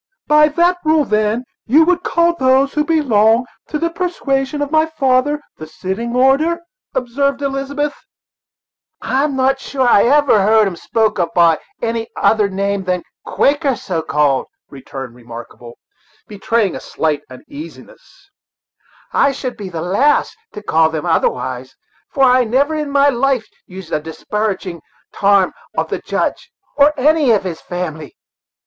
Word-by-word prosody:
"By 300 Hz, 0 st, +5 dB
that 345 Hz, +4 st, +1 dB
rule, 310 Hz, -1 st, +3 dB
then, 215 Hz, +2 st, 0 dB, 0.2 s
you 305 Hz, +7 st, +5 dB
would 360 Hz, +1 st, +2 dB
call 340 Hz, 0 st, +2 dB
those 265 Hz, -2 st, +2 dB
who 300 Hz, -, +1 dB
belong' 245 Hz, -7 st, +3 dB, 0.2 s
to 300 Hz, -, -3 dB
the 335 Hz, +2 st, -1 dB
persuasion 295 Hz, -5 st, -2 dB
of 290 Hz, -, -5 dB
my 315 Hz, 0 st, +3 dB
father, 285 Hz, -1 st, +1 dB, 0.2 s
the 155 Hz, -, -9 dB
sitting 200 Hz, +9 st, -4 dB
order," 280 Hz, +7 st, +2 dB, 0.3 s
observed 270 Hz, +2 st, -1 dB
Elizabeth. 280 Hz, +2 st, -2 dB, 1.1 s
"I'm 275 Hz, +1 st, -1 dB, 0.2 s
sure 265 Hz, -1 st, -2 dB
I've 205 Hz, -3 st, +5 dB
never 275 Hz, -5 st, +4 dB
heard 215 Hz, +2 st, +4 dB
'em 190 Hz, -3 st, -3 dB
spoken 215 Hz, 0 st, 0 dB
of -, -, -18 dB
by 170 Hz, -2 st, +4 dB, 0.2 s
any 230 Hz, -1 st, -2 dB
other' 210 Hz, -2 st, +2 dB
name 200 Hz, 0 st, -2 dB
than 180 Hz, -1 st, -1 dB, 0.2 s
Quakers, 285 Hz, -2 st, +1 dB
so 170 Hz, -4 st, -2 dB
called," 145 Hz, -3 st, +1 dB, 0.2 s
returned 135 Hz, -2 st, -8 dB
Remarkable, 120 Hz, 0 st, -11 dB, 0.5 s
betraying 210 Hz, -1 st, -1 dB
a -, -, -5 dB
slight 155 Hz, -2 st, -2 dB
uneasiness; 335 Hz, -, -13 dB, 0.8 s
"I 280 Hz, -, +3 dB
should 255 Hz, -2 st, -5 dB
be 200 Hz, -3 st, -7 dB
the 165 Hz, -3 st, -5 dB
last 255 Hz, +12 st, +1 dB, 0.2 s
to 210 Hz, -, -8 dB
call 160 Hz, -4 st, +3 dB
them 160 Hz, 0 st, -4 dB
otherwise, 130 Hz, -5 st, -1 dB, 0.4 s
for 270 Hz, -, +1 dB
I 255 Hz, -1 st, +5 dB
never 265 Hz, +7 st, +1 dB
in 305 Hz, -2 st, -3 dB
my 280 Hz, 0 st, +4 dB
life 260 Hz, -2 st, 0 dB, 0.2 s
used 185 Hz, -2 st, -10 dB
a 155 Hz, -, +1 dB
disparaging' 185 Hz, +2 st, -4 dB, 0.3 s
tarm 200 Hz, -2 st, +3 dB, 0.2 s
of -, -, 0 dB
the -, -, -2 dB
Judge, -, -, -3 dB, 0.2 s
or 290 Hz, +1 st, +5 dB
any 300 Hz, 0 st, +3 dB
of 215 Hz, -4 st, +3 dB
his 175 Hz, -4 st, -5 dB
family. 160 Hz, -5 st, -6 dB
240 Hz, 145 wpm, -17 LUFS, 185-285 Hz, 1.1 s, By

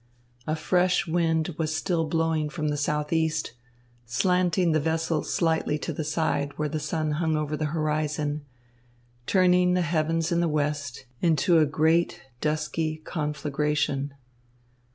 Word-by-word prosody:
A 155 Hz, -, +1 dB
fresh 180 Hz, +3 st, +2 dB
wind 165 Hz, -1 st, +1 dB
was 155 Hz, -1 st, 0 dB
still 165 Hz, 0 st, 0 dB
blowing 160 Hz, -1 st, 0 dB
from 155 Hz, -1 st, -2 dB
the 150 Hz, -, 0 dB
southeast, 150 Hz, 0 st, 0 dB, 0.5 s
slanting 180 Hz, +6 st, +2 dB
the 155 Hz, -, +3 dB
vessel 160 Hz, 0 st, 0 dB
slightly 160 Hz, -3 st, 0 dB
to -, -, -4 dB
the 155 Hz, -, -3 dB
side 145 Hz, -2 st, -1 dB
where 150 Hz, -, 0 dB
the 155 Hz, +1 st, -3 dB
sun 155 Hz, 0 st, -2 dB
hung 160 Hz, 0 st, 0 dB
over 150 Hz, 0 st, -2 dB
the 155 Hz, -, -2 dB
horizon, 150 Hz, -1 st, -1 dB, 0.8 s
turning 180 Hz, -1 st, +4 dB
the 180 Hz, -, +2 dB
heavens 165 Hz, 0 st, 0 dB
in 170 Hz, -, +2 dB
the 170 Hz, -1 st, +2 dB
west 145 Hz, -3 st, -2 dB, 0.2 s
into 165 Hz, 0 st, +4 dB
a 155 Hz, -, +4 dB
great, 160 Hz, +4 st, +2 dB, 0.2 s
dusky 155 Hz, +1 st, -1 dB
conflagration. 150 Hz, -2 st, -1 dB
155 Hz, 135 wpm, -26 LUFS, 150-165 Hz, 0.8 s, turning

